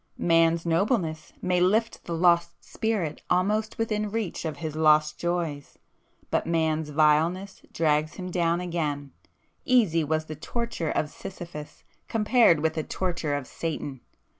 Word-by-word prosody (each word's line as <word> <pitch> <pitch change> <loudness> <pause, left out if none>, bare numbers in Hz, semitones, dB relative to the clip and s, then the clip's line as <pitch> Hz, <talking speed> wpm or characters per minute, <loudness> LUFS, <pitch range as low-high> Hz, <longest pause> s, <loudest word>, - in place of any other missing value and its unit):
Man's 165 0 +3
nobleness 165 -2 0
may 180 -1 +2
lift 220 +5 +1
the 170 - -3
Lost 170 0 +2
Spirit 215 -9 -2
almost 210 +4 +1
within 215 -2 -1
reach 210 -6 -3
of 155 -2 -3
his 155 0 -5
lost 155 -1 +3
joys,—but 170 -5 -4
Man's 160 -2 0
vileness 160 +6 +2
drags 155 -1 +1
him 185 -1 -6
down 170 -1 +1
again,—easy 165 - -1
was 155 +1 -1
the 155 - -7
torture 230 - -3
of 150 - -1
Sisyphus 170 -6 -9 0.2
compared 220 -7 +4
with 160 0 +1
the 155 - -2
torture 170 -6 -2
of 145 -2 -3
Satan! 145 -3 -5
165 Hz, 130 wpm, -26 LUFS, 155-185 Hz, 0.2 s, compared